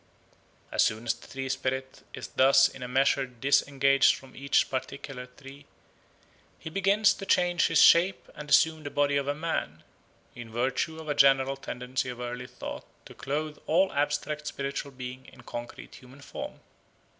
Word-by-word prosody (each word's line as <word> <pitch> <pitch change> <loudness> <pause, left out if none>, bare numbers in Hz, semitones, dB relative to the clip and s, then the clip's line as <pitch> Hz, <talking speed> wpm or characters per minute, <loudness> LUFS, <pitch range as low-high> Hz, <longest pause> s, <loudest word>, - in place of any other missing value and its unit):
As - - +3
soon 110 +2 -1
as 115 - +1
the - - -16
tree 135 0 -5
spirit 130 0 -3
is - - -8
thus 135 +1 +5
in 135 - -12
a 125 - -4
measure 135 +1 +2
disengaged 135 +2 +3
from 135 -1 -14
each 140 +1 +1
particular 135 -1 -5
tree, 135 +2 -14 0.9
he 160 - -9
begins 200 +3 +3
to - - -9
change 175 -2 +3
his - - +2
shape 180 +3 +5
and 150 0 -9
assume 160 +2 +4
the 145 - -6
body 145 0 +1
of 140 -1 0
a 145 - 0
man, 150 - -3 0.5
in 120 -1 -10
virtue 130 +7 -1
of 160 - -10
a 145 - 0
general 135 -1 +4
tendency 125 -1 -4
of 125 -1 -7
early 125 0 -5
thought - - -8 0.2
to - - -12
clothe 150 +2 -4
all 190 +4 +2
abstract 150 +1 -2
spiritual 140 0 -4
beings 130 -1 -9
in 130 - -16
concrete 120 0 -8
human 130 +2 -15
form. - - -8
135 Hz, 165 wpm, -28 LUFS, 130-150 Hz, 0.9 s, thus